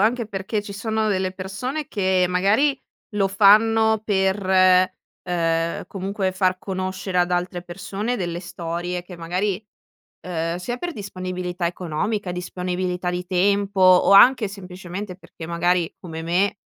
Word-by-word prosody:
anche 230 +3 +2
perché 200 +1 -3
ci 205 -1 -8
sono 220 +1 -1
delle 190 -2 0
persone 225 +11 -4
che, 190 -3 +1
magari, 205 +11 +2 0.4
lo 195 -2 +2
fanno 220 +2 +5
per, 190 -1 +1 0.8
uhm, 165 -2 -1
comunque, 195 0 -3
far 185 -1 +1
conoscere 185 -1 -3
ad 175 0 +2
altre 175 0 -1
persone 195 +6 -4
delle 175 -2 -3
storie 175 0 -4
che, 180 0 -11
magari 185 +5 -2 0.6
uhm, 165 -1 -3
sia 240 +7 -4
per 350 +7 -4
disponibilità 185 -2 -4
economica, 180 +3 -2
disponibilità 180 0 -3
di 180 0 -3
tempo, 195 +2 +1
o 185 +1 +6
anche, 225 +2 +7
semplicemente, 185 0 -7
perché, 165 -3 -11
magari, 175 0 +1
come 165 -3 -7
me, 185 +5 +1
185 Hz, 135 wpm, -22 LUFS, 180-205 Hz, 0.8 s, anche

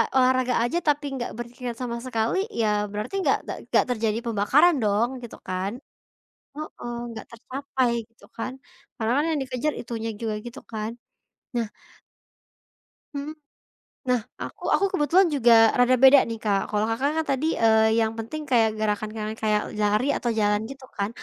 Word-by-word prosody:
olahraga 255 -1 +3
aja 245 +8 0
tapi 295 0 +2
nggak 240 - -4
berpikir 240 +1 -5
sama 235 -1 -3
sekali 230 +4 0 0.2
ya 220 - +2 0.2
berarti 210 - -5
nggak - - +3
nggak - - -5
nggak - - +4
terjadi 220 -2 0
pembakaran 235 +10 +4
dong 210 +3 +2 0.2
gitu 235 - -9
kan. 185 +2 -2 0.8
Heeh, 290 -5 -6 0.2
nggak 225 - -8
tercapai 260 +1 -2 0.2
gitu 230 - -20
kan. 240 +3 -3 0.5
Karena 220 0 0
kan 295 - +3
yang 305 - 0
dikejar 260 +3 -1
itunya 225 -1 -4
juga 220 -2 -2
gitu 240 +4 -8
kan. 215 0 -3 0.6
Nah 230 -2 0 1.5
Mhm, 285 +1 -4 0.8
nah, 250 - +3 0.2
aku - - -7
aku 395 - +3
kebetulan 360 +4 +4
juga 245 -5 +4 0.2
rada 245 +1 +5
beda 270 +1 +9
nih 225 - -3
Kak 200 -2 +2
kalau 210 0 +1
Kakak 260 +6 +1
kan 320 - 0
tadi, 275 +3 0
eee, 220 -1 +4
yang 220 -1 +2
penting 230 +8 -5
kayak 230 -3 +4
gerakan-gerakan 215 +1 -2
kayak 210 -1 +2 0.2
lari 210 +6 +2
atau 240 -1 -1
jalan 210 0 +2
gitu 270 +1 -10
kan. 200 +1 0
235 Hz, 160 wpm, -25 LUFS, 220-260 Hz, 1.5 s, beda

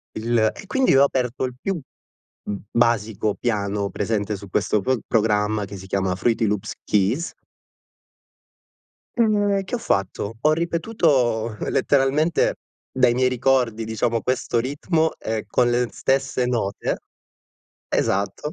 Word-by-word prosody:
il, 115 +2 0 0.2
e - - -11
quindi 265 +4 +2
io 135 - +6
ho 140 - +7
aperto 130 -1 -1
il 125 - -4
più 195 +5 -2
b 155 - -7 0.9
basico 110 -3 +1
piano 100 -3 -1
presente 105 -2 -1
su 100 0 -11
questo 105 +2 +1
pro 130 +4 0
programma 105 -1 +1
che 100 +1 -8
si 95 0 -10
chiama 95 -1 0
FruityLoops 105 0 0
Keys 105 - +1 1.9
E 205 -3 +2
che 190 - -11
ho 245 - 0
fatto, 100 - -1
ho 150 +5 +3
ripetuto 155 - +1
letteralmente 145 +4 +2 0.4
dai 125 -2 +3
miei 130 0 +3
ricordi 125 -3 +1
diciamo, 115 +1 -1
questo 125 -2 0
ritmo, 160 +5 0
ehm, 110 -1 -3
con 120 +3 +2
le 120 0 +1
stesse 135 -2 0
note. 115 -5 -1 0.9
Esatto. 100 +9 -1
120 Hz, 130 wpm, -23 LUFS, 105-135 Hz, 1.9 s, ho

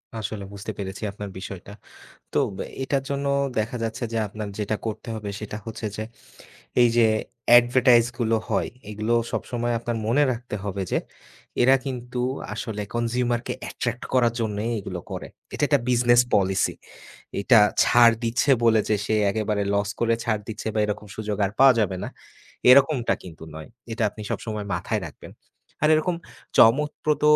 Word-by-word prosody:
আসলে 105 -2 -4
বুঝতে 100 0 -6
পেরেছি 95 +1 -6
আপনার 100 0 -7
বিষয়টা। 95 +1 -8 0.6
তো - - +3 0.4
এটার 135 0 0
জন্য 140 0 -2 0.3
দেখা 115 +4 -2
যাচ্ছে 115 +3 -3
যে 115 - 0
আপনার 105 +1 -6
যেটা 105 +1 -1
করতে 110 - -5
হবে 105 -2 -5
সেটা 105 0 -6
হচ্ছে 115 -1 -6
যে, 110 - -2 0.8
এইযে 120 -1 +4 0.5
advertise 120 -1 +4
গুলো 115 -1 +2
হয় - - +1 0.2
এগুলো 105 +2 -1 0.2
সবসময় 120 -1 -2
আপনার 120 -1 -3
মনে 135 +6 +3
রাখতে 120 -2 -6
হবে 100 -1 -3
যে - - +3 0.6
এরা 130 +2 +6
কিন্তু 125 -1 -4 0.3
আসলে 105 -3 -4
consumer 120 0 0
কে - - -2 0.2
attract 120 0 -3
করার 120 -3 +4
জন্যই 110 0 -2
এগুলো 90 -2 -6
করে। - - -6 0.3
এটা - - -4
একটা 145 -3 +3
business 120 0 +5
policy। 95 -1 +2 0.7
এটা 115 +3 +6 0.2
ছাড় 120 -1 +6
দিচ্ছে 120 +5 +1
বলে 110 -2 +5
যে 105 - +4
সে 110 - +1 0.2
একেবারে 105 -1 -1
loss 100 0 0
করে 115 -1 +3
ছাড় 110 -3 0
দিচ্ছে 110 0 -4
বা - - 0
এরকম 105 0 -4
সুযোগ 105 -2 -3
আর - - -4
পাওয়া 135 -2 +8
যাবে 100 -3 0
না, - - -4 0.6
এরকমটা 135 -1 +5
কিন্তু 80 -3 -11
নয়। 80 0 -9 0.2
এটা 115 - -3
আপনি 105 - -10
সবসময় 105 -2 -4
মাথায় 100 +4 -2
রাখবেন। 75 - -12 0.5
আর - - +5
এরকম 170 +3 +1 0.4
চমৎপ্রদ 150 +5 +4
115 Hz, 160 wpm, -24 LUFS, 105-120 Hz, 0.8 s, পাওয়া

